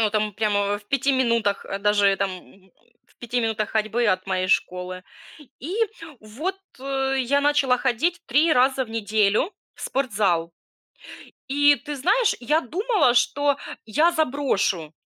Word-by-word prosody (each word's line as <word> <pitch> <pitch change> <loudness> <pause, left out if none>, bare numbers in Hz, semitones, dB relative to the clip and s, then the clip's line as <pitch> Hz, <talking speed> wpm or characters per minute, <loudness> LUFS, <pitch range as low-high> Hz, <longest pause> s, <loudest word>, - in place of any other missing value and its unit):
Ну, 215 -2 +2
там 215 -1 -1
прямо 205 -1 0
в 205 - -21
5 275 0 +1
минутах, 235 -6 0
даже 205 -1 +3
там, 195 -1 -1
м, 185 0 -14 0.3
в - - -30
5 240 +1 -2
минутах 220 -2 -1
ходьбы 220 +2 0
от 185 -2 0
моей 185 -1 -1
школы. 185 -1 -1 0.6
И 345 - -5 0.4
вот, 280 - -5 0.2
э, 270 0 -1
я 275 +3 +1
начала 285 -3 +3
ходить 270 +8 -1
3 295 +6 +3
раза 260 0 +2
в - - -15
неделю 215 - +1 0.2
в - - -18
спортзал. 205 -11 0 1.0
И 290 +1 +5
ты 290 +3 -7
знаешь, 400 - +2
я 300 +6 +1
думала, 350 - +1
что 285 +3 +2 0.3
я 305 +11 +2
заброшу, 245 - -1
240 Hz, 145 wpm, -23 LUFS, 205-285 Hz, 1.0 s, И